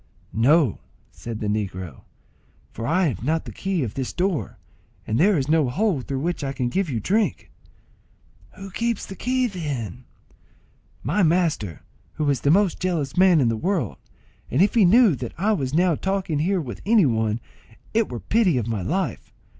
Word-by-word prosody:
"No," 135 Hz, -, +3 dB, 0.3 s
said 110 Hz, -, -7 dB
the 105 Hz, -, -2 dB
negro, 95 Hz, -7 st, -4 dB, 0.7 s
"for 115 Hz, -, -5 dB
I 180 Hz, +5 st, +2 dB
have 110 Hz, -5 st, -6 dB
not 160 Hz, +4 st, 0 dB
the -, -, -7 dB
key 190 Hz, -5 st, -2 dB
of 110 Hz, -, -4 dB
this 130 Hz, -2 st, -3 dB
door, 180 Hz, -3 st, -2 dB, 0.5 s
and 110 Hz, +3 st, -1 dB
there 195 Hz, +2 st, +4 dB
is 135 Hz, -1 st, -1 dB
no 155 Hz, -4 st, +3 dB
hole 185 Hz, -, 0 dB
through 135 Hz, +1 st, -4 dB
which 170 Hz, 0 st, -2 dB
I 135 Hz, 0 st, -2 dB
can 125 Hz, -2 st, -1 dB
give 190 Hz, +5 st, -1 dB
you 120 Hz, -5 st, -1 dB
drink." 210 Hz, -, 0 dB, 1.0 s
"Who 195 Hz, 0 st, -9 dB
keeps 230 Hz, +2 st, -2 dB
the 195 Hz, -, -9 dB
key, 255 Hz, +5 st, 0 dB
then?" 140 Hz, -, -4 dB, 1.0 s
"My 210 Hz, -, +1 dB
master, 160 Hz, -, +1 dB, 0.3 s
who 150 Hz, -1 st, -2 dB
is 135 Hz, -, -1 dB
the 140 Hz, -, +1 dB
most 190 Hz, +2 st, +3 dB
jealous 165 Hz, -7 st, -1 dB
man 180 Hz, -3 st, +5 dB
in 125 Hz, -4 st, +3 dB
the 115 Hz, -, 0 dB
world; 170 Hz, -, -1 dB, 0.5 s
and 130 Hz, -, 0 dB
if 205 Hz, -, +2 dB
he 225 Hz, -5 st, +5 dB
knew 220 Hz, +1 st, +6 dB
that 120 Hz, -2 st, -6 dB
I 205 Hz, +6 st, +2 dB
was 135 Hz, -10 st, -2 dB
now 175 Hz, +3 st, +3 dB
talking 190 Hz, -2 st, -1 dB
here 185 Hz, +5 st, +1 dB
with 125 Hz, -6 st, -7 dB
any 215 Hz, -3 st, +4 dB
one, 110 Hz, -3 st, 0 dB, 0.5 s
it 225 Hz, -1 st, +2 dB
were 120 Hz, -, -5 dB
pity 200 Hz, -, +2 dB
of 120 Hz, -, -1 dB
my 110 Hz, -3 st, -2 dB
life. 165 Hz, -, -2 dB
155 Hz, 185 wpm, -23 LUFS, 120-190 Hz, 1.0 s, knew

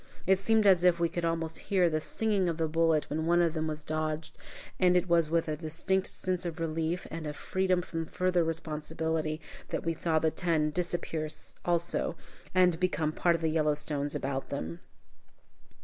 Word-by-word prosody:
It 190 Hz, 0 st, +4 dB
seemed 220 Hz, +2 st, +3 dB
as 185 Hz, -3 st, +6 dB
if 180 Hz, -1 st, +4 dB
we 170 Hz, -1 st, +2 dB
could 175 Hz, -, -3 dB
almost 165 Hz, -1 st, -2 dB
hear 185 Hz, -3 st, +4 dB
the 155 Hz, -2 st, +1 dB
singing 200 Hz, +2 st, 0 dB
of 165 Hz, -, -2 dB
the 165 Hz, -1 st, +1 dB
bullet 160 Hz, -1 st, +2 dB
when 160 Hz, +2 st, -2 dB
one 175 Hz, +1 st, +4 dB
of 170 Hz, -2 st, +3 dB
them 160 Hz, -1 st, -1 dB
dodged, 155 Hz, 0 st, -2 dB, 0.4 s
and 180 Hz, -1 st, +5 dB
it 180 Hz, +1 st, +1 dB
was 170 Hz, -3 st, +3 dB
with 165 Hz, 0 st, +1 dB
a 155 Hz, -, -1 dB
distinct 165 Hz, +5 st, -1 dB
sense 185 Hz, -1 st, -2 dB
of 170 Hz, -1 st, -4 dB
relief, 165 Hz, +2 st, -1 dB
and 160 Hz, -1 st, -5 dB
of 150 Hz, -, -4 dB
freedom 185 Hz, +1 st, 0 dB
from 165 Hz, -1 st, -4 dB
further 180 Hz, 0 st, +1 dB
responsibility, 160 Hz, 0 st, -2 dB, 0.3 s
that -, -, -3 dB
we 165 Hz, -, +1 dB
saw 160 Hz, 0 st, 0 dB
the 160 Hz, 0 st, +2 dB
ten 160 Hz, -4 st, +1 dB
disappear 170 Hz, -2 st, -2 dB, 0.4 s
also, 170 Hz, -1 st, 0 dB, 0.4 s
and 180 Hz, -3 st, +4 dB
become 165 Hz, -4 st, +1 dB
part 170 Hz, +2 st, +2 dB
of 165 Hz, -, -4 dB
the 160 Hz, -, +1 dB
yellow 155 Hz, -1 st, +2 dB
stones 145 Hz, -1 st, -3 dB
about 135 Hz, 0 st, -3 dB
them. 85 Hz, +2 st, -4 dB
165 Hz, 185 wpm, -30 LUFS, 155-180 Hz, 0.4 s, as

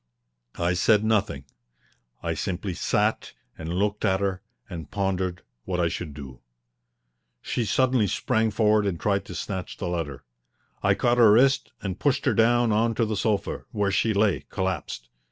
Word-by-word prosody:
I 85 Hz, +1 st, +1 dB
said 105 Hz, +4 st, +3 dB
nothing. 105 Hz, -10 st, 0 dB, 0.8 s
I -, -, -1 dB
simply 95 Hz, +1 st, -3 dB
sat -, -, 0 dB, 0.2 s
and 80 Hz, 0 st, -6 dB
looked 100 Hz, +3 st, -1 dB
at 95 Hz, 0 st, +2 dB
her 95 Hz, -2 st, -1 dB, 0.3 s
and 85 Hz, -6 st, -8 dB
pondered 95 Hz, -3 st, -2 dB, 0.2 s
what 90 Hz, -1 st, -2 dB
I 85 Hz, -1 st, +2 dB
should 80 Hz, -4 st, -5 dB
do. 65 Hz, -4 st, -9 dB, 1.0 s
She 120 Hz, -, -2 dB
suddenly 125 Hz, +1 st, +2 dB
sprang 110 Hz, +3 st, +1 dB
forward 105 Hz, -1 st, +2 dB
and 85 Hz, -4 st, -2 dB
tried 100 Hz, -1 st, 0 dB
to 90 Hz, -, -8 dB
snatch 95 Hz, +2 st, -5 dB
the 90 Hz, -, -4 dB
letter. 80 Hz, -6 st, -4 dB, 0.6 s
I -, -, +3 dB
caught 120 Hz, 0 st, +2 dB
her 115 Hz, -3 st, +7 dB
wrist 135 Hz, +3 st, +3 dB
and 95 Hz, -2 st, -4 dB
pushed 140 Hz, -2 st, +1 dB
her 130 Hz, -, +3 dB
down 120 Hz, +1 st, +3 dB
on 115 Hz, +2 st, +2 dB
to 115 Hz, -, +2 dB
the 110 Hz, 0 st, -2 dB
sofa, 105 Hz, 0 st, -1 dB
where 100 Hz, -2 st, 0 dB
she 100 Hz, +4 st, +2 dB
lay, 100 Hz, -2 st, +1 dB
collapsed. 95 Hz, -10 st, -3 dB
100 Hz, 165 wpm, -25 LUFS, 90-110 Hz, 1.0 s, her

